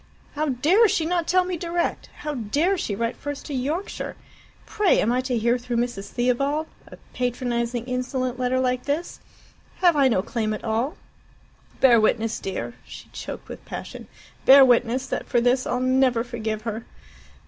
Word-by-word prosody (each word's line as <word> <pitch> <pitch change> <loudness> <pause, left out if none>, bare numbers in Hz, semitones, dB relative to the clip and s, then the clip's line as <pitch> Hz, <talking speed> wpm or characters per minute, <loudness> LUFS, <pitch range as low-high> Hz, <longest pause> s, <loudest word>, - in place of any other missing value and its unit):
"How 300 +1 -1
dare 320 - +4
she 330 -5 0
not 345 0 0
tell 365 0 +3
me 360 -1 -3
direct! 340 +1 -2
How 300 - -3
dare 285 - +1
she 215 - -3
write 230 +2 -2
first 290 -1 -6
to 290 - -6
Yorkshire! 295 +9 -3 0.5
Pray, 420 -3 +2
am 225 - +2
I 250 +1 +1
to 255 -2 -1
hear 235 +2 +2
through 240 0 -3
Mrs. 235 -5 -2
Theobald 275 +5 0 0.2
a - - -12 0.2
patronizing, 240 -1 -2
insolent 255 0 -2
letter 255 +1 +1
like 250 -1 0
this? 295 +5 -2 0.6
Have 350 -3 +4
I 280 -2 +5
no 205 -7 +1
claim 215 -1 -2
at - - -9
all? 235 +6 -1 0.8
Bear 240 -4 +6
witness, 220 +1 +1
dear" 195 +4 -4
she - - -12
choked - - -8
with - - -9
passion - - -8 0.4
"bear 270 0 +9
witness 250 +1 +2
that - - -4
for 245 - +2
this 245 +2 +2
I'll 250 - 0
never 255 -2 +2
forgive 220 -3 -4
her!" 225 0 -5
250 Hz, 170 wpm, -24 LUFS, 235-290 Hz, 0.8 s, bear